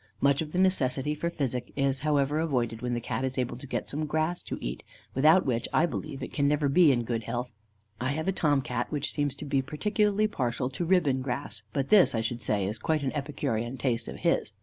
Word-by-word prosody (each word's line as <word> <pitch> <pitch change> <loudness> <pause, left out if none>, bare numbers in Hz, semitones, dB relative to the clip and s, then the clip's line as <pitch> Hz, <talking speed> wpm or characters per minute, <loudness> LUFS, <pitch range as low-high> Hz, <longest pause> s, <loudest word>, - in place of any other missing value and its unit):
Much 140 +1 +3
of 155 -1 -5
the 180 - -3
necessity 150 -6 +2
for 160 +3 -2
physic 130 -7 -3
is, 135 -1 +1
however, 145 0 +1
avoided 120 -8 -1
when 125 -1 -1
the - - -1
Cat 130 - -3
is 130 0 -2
able 125 -1 -1
to 130 +3 -10
get - - -3
some 155 +2 -2
grass 160 +3 0
to - - -5
eat, - - -4 0.3
without 155 +7 +5
which, 120 -2 0
I 160 - +4
believe, 135 - -5
it - - -6
can 140 -1 +2
never 145 0 +2
be 160 +1 +6
in 120 -3 +1
good 115 -1 -2
health. 125 0 -3 0.5
I 130 +3 0
have 160 +3 -3
a - - +3
Tom 145 -7 +2
Cat, 125 -1 -3
which 150 -1 -2
seems 145 -2 -1
to - - -8
be 140 -1 +1
particularly 205 +8 +1
partial 125 - -1
to 170 +6 -3
ribbon 160 -7 +3
grass, 125 -4 -4
but 135 +4 -1
this, 200 - +6
I 115 - +1
should 115 +1 -3
say, 100 -3 0
is 105 +3 -3
quite 155 +2 0
an 135 - 0
epicurean 135 -4 -2
taste 120 -2 -1
of - - -6
his. - - 0
140 Hz, 235 wpm, -28 LUFS, 125-155 Hz, 0.5 s, be